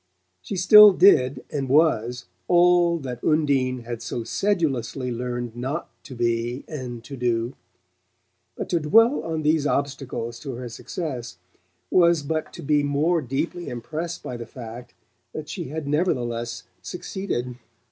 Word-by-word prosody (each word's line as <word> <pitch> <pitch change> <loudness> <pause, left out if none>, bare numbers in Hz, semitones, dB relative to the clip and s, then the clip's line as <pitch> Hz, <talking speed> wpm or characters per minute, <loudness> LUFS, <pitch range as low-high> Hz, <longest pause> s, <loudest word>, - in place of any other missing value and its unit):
She 195 - -5
still 205 +2 +9
did 155 -9 +4
and 140 -3 -3
was 125 -5 +2 0.2
all 175 -1 +4
that 125 -5 -7
Undine 135 -5 +1
had 115 -1 -6
so 120 - -4
sedulously 135 - -1
learned 120 -1 -4
not 135 +7 -4
to 130 - -9
be 120 +2 -1
and 125 -6 -6
to 140 +3 -8
do; 120 -1 -1 1.0
but - - -5
to 170 - +2
dwell 225 - +4
on 160 -1 -3
these 150 -1 +2
obstacles 135 -5 -3
to 135 +2 -6
her 125 0 -6
success 120 - -6 0.5
was 170 -4 +4
but 155 +2 -3
to - - -9
be 150 +1 +2
more 150 +4 +1
deeply 155 +7 -3
impressed 160 +8 -5
by 125 - -5
the 115 -1 -8
fact 120 0 -10 0.4
that 155 -1 -6
she 175 - -5
had 150 +1 -5
nevertheless 120 -7 -1 0.2
succeeded. 125 -10 -4
140 Hz, 140 wpm, -24 LUFS, 120-165 Hz, 1.0 s, still